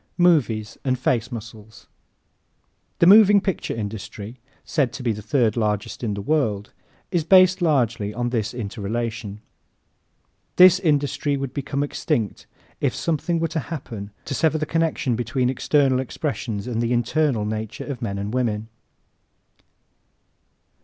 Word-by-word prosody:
Movies 130 Hz, -, +2 dB
and 130 Hz, -2 st, 0 dB
Face 125 Hz, -1 st, 0 dB
Muscles 110 Hz, -2 st, -10 dB, 1.1 s
¶ -, -, -44 dB
The -, -, +4 dB
moving 205 Hz, +1 st, +8 dB
picture 190 Hz, -1 st, -3 dB
industry 105 Hz, +1 st, -6 dB, 0.2 s
said 140 Hz, -6 st, 0 dB
to 130 Hz, -, -7 dB
be 120 Hz, -, +1 dB
the 105 Hz, 0 st, -5 dB
third 120 Hz, -1 st, +1 dB
largest 105 Hz, 0 st, -2 dB
in 105 Hz, -3 st, -1 dB
the 100 Hz, -, -5 dB
world 105 Hz, -8 st, 0 dB, 0.4 s
is 175 Hz, -4 st, +1 dB
based 185 Hz, +2 st, +5 dB
largely 120 Hz, -10 st, +1 dB
on 120 Hz, +2 st, -2 dB
this 110 Hz, -3 st, -1 dB
interrelation. 110 Hz, -1 st, -4 dB, 1.1 s
This 185 Hz, 0 st, +8 dB
industry 145 Hz, -3 st, 0 dB
would 135 Hz, -2 st, -4 dB
become 140 Hz, 0 st, -2 dB
extinct 115 Hz, -7 st, -2 dB, 0.3 s
if -, -, 0 dB
something 165 Hz, +1 st, -1 dB
were 165 Hz, -, +1 dB
to 165 Hz, -, -2 dB
happen 115 Hz, -11 st, -6 dB, 0.2 s
to -, -, -4 dB
sever 160 Hz, +3 st, +2 dB
the 155 Hz, -, -2 dB
connection 160 Hz, -6 st, 0 dB
between 125 Hz, +2 st, 0 dB
external 135 Hz, 0 st, +2 dB
expressions 120 Hz, -6 st, -3 dB
and 120 Hz, -2 st, -2 dB
the 120 Hz, +1 st, 0 dB
internal 120 Hz, -1 st, +1 dB
nature 110 Hz, 0 st, -4 dB
of 135 Hz, -4 st, -6 dB
men 100 Hz, -4 st, -3 dB
and 100 Hz, +2 st, -4 dB
women. 110 Hz, -4 st, -1 dB
125 Hz, 140 wpm, -23 LUFS, 110-150 Hz, 1.1 s, moving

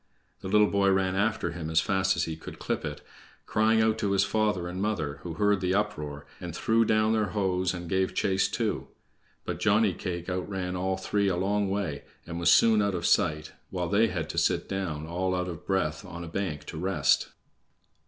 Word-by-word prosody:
The -, -, -7 dB
little 105 Hz, +2 st, +5 dB
boy 100 Hz, -1 st, +3 dB
ran 95 Hz, -1 st, +2 dB
after 105 Hz, +3 st, 0 dB
him 80 Hz, -3 st, -5 dB
as 80 Hz, 0 st, +3 dB
fast 95 Hz, +2 st, +1 dB
as -, -, 0 dB
he 80 Hz, -, -3 dB
could 80 Hz, -, -10 dB
clip -, -, -2 dB
it, -, -, -5 dB, 0.4 s
crying 110 Hz, +1 st, +3 dB
out 110 Hz, 0 st, +1 dB
to 100 Hz, -2 st, 0 dB
his 100 Hz, 0 st, +4 dB
father 105 Hz, -3 st, 0 dB
and 90 Hz, +2 st, -4 dB
mother, 80 Hz, -9 st, -2 dB
who 85 Hz, -2 st, -6 dB
heard 105 Hz, +1 st, +2 dB
the 90 Hz, 0 st, +1 dB
uproar, 75 Hz, -8 st, -2 dB
and 85 Hz, -2 st, -6 dB
threw 115 Hz, +4 st, +2 dB
down 110 Hz, 0 st, +3 dB
their 110 Hz, -2 st, +1 dB
hoes 95 Hz, -2 st, +1 dB
and 90 Hz, -1 st, -6 dB
gave 95 Hz, +2 st, 0 dB
chase 95 Hz, -1 st, +2 dB
too. -, -, -2 dB, 0.6 s
But -, -, -4 dB
Johnny 105 Hz, -1 st, +3 dB
cake 85 Hz, -1 st, -5 dB
outran 90 Hz, 0 st, -3 dB
all 95 Hz, +1 st, -1 dB
three 100 Hz, +1 st, 0 dB
a 95 Hz, -, +1 dB
long 100 Hz, +2 st, 0 dB
way, 95 Hz, -8 st, -2 dB, 0.2 s
and 85 Hz, 0 st, -5 dB
was 85 Hz, -, +3 dB
soon 110 Hz, -2 st, +6 dB
out 100 Hz, -2 st, 0 dB
of 85 Hz, -, -3 dB
sight, 75 Hz, 0 st, +2 dB, 0.2 s
while 90 Hz, -3 st, -3 dB
they 105 Hz, +4 st, +4 dB
had 85 Hz, -7 st, -3 dB
to -, -, 0 dB
sit -, -, +1 dB
down, 85 Hz, -6 st, -3 dB
all 90 Hz, +3 st, -1 dB
out 90 Hz, 0 st, -1 dB
of 85 Hz, -2 st, -8 dB
breath, 90 Hz, -5 st, 0 dB
on 85 Hz, -3 st, -8 dB
a -, -, -7 dB
bank 80 Hz, -3 st, -3 dB
to 80 Hz, -, -7 dB
rest. 90 Hz, -6 st, +2 dB
95 Hz, 210 wpm, -28 LUFS, 85-100 Hz, 0.6 s, soon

